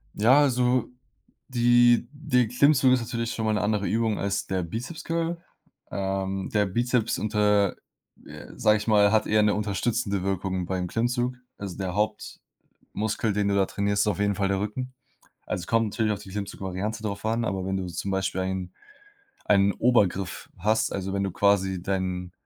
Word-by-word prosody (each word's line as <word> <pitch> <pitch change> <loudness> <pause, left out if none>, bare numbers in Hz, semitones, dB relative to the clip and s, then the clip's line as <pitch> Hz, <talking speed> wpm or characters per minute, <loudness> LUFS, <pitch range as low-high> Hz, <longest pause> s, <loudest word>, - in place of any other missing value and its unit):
Ja, 125 +7 +5
also, 125 -2 +2 0.6
die 120 -1 +4
die 145 -5 +1
Klimmzug 130 +2 +4
ist 125 - +2
natürlich 115 0 -3
schon 110 - -3
mal 110 - +1
'ne 105 - 0
andere 105 -1 0
Übung 110 -1 0
als 100 0 -2
der 95 -1 -1
Bizeps 115 - -6
Curl. 165 +1 -1 0.5
Ähm, 95 0 -2
der 105 -1 +3
Bizeps 120 +3 0
unter 105 -2 +2 0.5
äh, - - -10
sage 110 -1 +3
ich 105 - -6
mal, 105 -2 +5
hat 110 -1 +2
eher 105 0 +3
'ne 105 -1 +3
unterstützende 100 -1 -1
Wirkung 95 -1 -2
beim 90 0 -2
Klimmzug. 120 +4 -1 0.2
Also, 100 -3 -6
der 95 -2 -3
Hauptmuskel, 105 0 -4
den 100 0 0
du 100 - +1
da 100 -1 +3
trainierst, 100 +1 0
ist - - -2
auf 105 -2 0
jeden 100 0 +1
Fall 95 0 0
der 100 -1 0
Rücken. 125 +6 -4 0.5
Also, 90 - -3
es - - -8
kommt 115 0 +2
natürlich 110 0 0
auf 105 - -4
die 95 - -12
Klimmzugvariante 100 +2 -4
drauf 100 -1 -4
an, 115 +1 0
aber 95 -3 -2
wenn 95 0 -1
du 95 -1 -3
zum 90 +3 -4
Beispiel 95 -1 -1
ein 95 -1 -3 0.7
einen 100 -1 +4
Obergriff 100 -7 +1
hast, 110 +4 +1
also, 95 0 -3
wenn 100 0 0
du 100 - -1
quasi 95 -2 +2
dein 90 -2 -2
105 Hz, 180 wpm, -26 LUFS, 95-115 Hz, 0.7 s, Ja